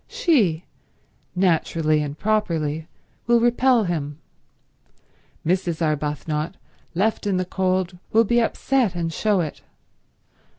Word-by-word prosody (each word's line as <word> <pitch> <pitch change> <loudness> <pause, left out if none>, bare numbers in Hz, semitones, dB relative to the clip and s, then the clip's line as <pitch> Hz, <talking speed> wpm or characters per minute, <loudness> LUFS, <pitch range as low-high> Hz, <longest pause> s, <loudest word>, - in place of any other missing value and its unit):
She, 245 - +2 0.7
naturally 165 -4 +2
and 145 0 -4
properly, 160 -8 -1 0.4
will 235 0 +5
repel 240 0 +3
him. 150 -6 -3 1.3
Mrs. 175 -1 0
Arbuthnot, 150 +1 -1 0.4
left 205 +3 0
in 195 -2 +1
the 185 - 0
cold, 185 -1 -1
will 225 +1 +5
be 240 +2 +2
upset 235 -3 +1
and 165 -1 -2
show 205 +1 +1
it. 155 -3 -5
180 Hz, 110 wpm, -23 LUFS, 160-220 Hz, 1.3 s, will